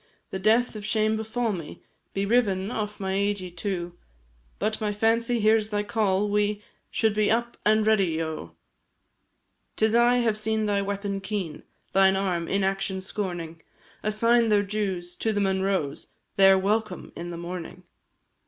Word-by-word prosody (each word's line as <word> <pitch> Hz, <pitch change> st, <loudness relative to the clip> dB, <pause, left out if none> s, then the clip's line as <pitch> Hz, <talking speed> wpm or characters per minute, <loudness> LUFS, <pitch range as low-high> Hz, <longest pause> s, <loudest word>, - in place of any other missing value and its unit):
The 190 Hz, -, -3 dB
death 225 Hz, +5 st, +3 dB
of 210 Hz, -, -6 dB
shame 215 Hz, 0 st, +2 dB
befal 220 Hz, +1 st, -1 dB
me, 165 Hz, -5 st, -8 dB, 0.3 s
Be 195 Hz, 0 st, 0 dB
riven 200 Hz, -3 st, +1 dB
off 210 Hz, -3 st, -4 dB
my 190 Hz, -1 st, -2 dB
eididh 195 Hz, -3 st, -1 dB
too, 175 Hz, -2 st, -3 dB, 0.6 s
But 215 Hz, 0 st, -1 dB
my 210 Hz, -1 st, 0 dB
fancy 230 Hz, +3 st, +1 dB
hears 215 Hz, 0 st, +3 dB
thy 210 Hz, -1 st, -1 dB
call 205 Hz, -2 st, +1 dB
we 210 Hz, 0 st, 0 dB, 0.3 s
Should 220 Hz, -1 st, +2 dB
all -, -, -8 dB
be 210 Hz, -1 st, +3 dB
up 235 Hz, +1 st, 0 dB
and 215 Hz, 0 st, +4 dB
ready, 195 Hz, -7 st, +2 dB
O! 155 Hz, -, -5 dB, 1.2 s
'Tis 220 Hz, 0 st, +2 dB
I 240 Hz, +1 st, +5 dB
have 230 Hz, -3 st, +1 dB
seen 220 Hz, 0 st, 0 dB
thy 205 Hz, -1 st, +1 dB
weapon 200 Hz, 0 st, -3 dB
keen, 190 Hz, -6 st, -4 dB, 0.3 s
Thine 190 Hz, 0 st, +5 dB
arm, 180 Hz, -4 st, -1 dB
inaction 195 Hz, -1 st, -1 dB
scorning, 175 Hz, -4 st, -5 dB, 0.4 s
Assign 230 Hz, +2 st, +3 dB
their 205 Hz, -1 st, +4 dB
dues 195 Hz, -4 st, -3 dB
to 225 Hz, -, 0 dB
the 205 Hz, -, 0 dB
Munroes, 190 Hz, -6 st, 0 dB, 0.3 s
Their 195 Hz, -1 st, +7 dB
welcome 205 Hz, -1 st, -1 dB
in 175 Hz, +1 st, -6 dB
the 170 Hz, -, -6 dB
morning. 175 Hz, +1 st, -7 dB
205 Hz, 155 wpm, -26 LUFS, 190-215 Hz, 1.2 s, Their